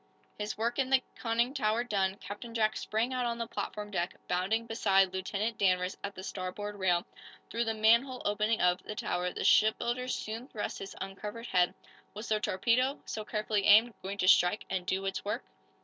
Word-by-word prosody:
His 210 0 -4
work 235 +4 -1
in 260 -1 +1
the 265 -1 +4
conning 235 +2 0
tower 230 -3 +1
done, 195 -5 0
Captain 205 +4 -8
Jack 215 -1 +2
sprang 225 +4 -1
out 250 -1 0
on 235 0 -2
the 230 - -2
platform 210 -2 -5
deck, 175 -2 -2
bounding 195 +6 0
beside 195 -4 +3
Lieutenant 200 +4 -2
Danvers 185 -1 +2
at 200 0 -5
the 185 - -8
starboard 195 +2 -5
rail. 180 -3 +1 0.5
Through 235 +1 0
the 225 0 -1
manhole 235 +4 +3
opening 210 +2 +1
of, 180 0 +3
the 210 - -7
tower 180 -3 -1
the - - -4
shipbuilder 235 +3 +3
soon 230 0 -4
thrust 210 -7 -4
his 195 - -7
uncovered 210 +4 -6
head. 180 -5 +2 0.4
Was 215 +3 -6
the 215 -1 +2
torpedo, 240 +8 +1
so 215 - -4
carefully 210 -1 -1
aimed, 220 +3 +7
going 195 +1 -5
to 185 - 0
strike 180 +2 +5
and 185 -1 -2
do 195 0 -1
its 195 0 -2
work? 205 - -2
210 Hz, 190 wpm, -31 LUFS, 195-230 Hz, 0.5 s, aimed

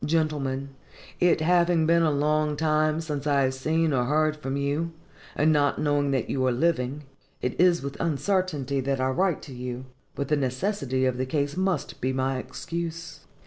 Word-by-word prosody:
GENTLEMEN: 145 -4 0 0.5
It 175 -2 +3
having 170 0 +3
been 170 +1 +4
a 165 - +3
long 150 +1 +1
time 155 0 +1
since 150 -3 -4
I 140 -1 +3
have 130 0 +1
seen 155 +4 0
or 125 -2 +1
heard 155 +3 +2
from 140 -2 -4
you, 145 +4 -1 0.4
and 155 +1 +3
not 145 -1 +2
knowing 145 -1 +1
that 135 -4 0
you 130 - -1
are - - +3
living, 135 0 0 0.4
it 125 - -3
is 175 -4 +4
with 140 0 -6
uncertainty 155 -3 0
that 135 0 -1
I 130 0 +1
write 180 +3 0
to 135 - -9
you; 125 0 -6 0.3
but 140 - -3
the 150 - +2
necessity 130 -1 -1
of 130 -1 0
the 130 - -1
case 145 +1 -1
must 190 0 -1
be 130 +1 0
my 130 0 0
excuse. 170 +3 -6
145 Hz, 185 wpm, -26 LUFS, 135-165 Hz, 0.5 s, been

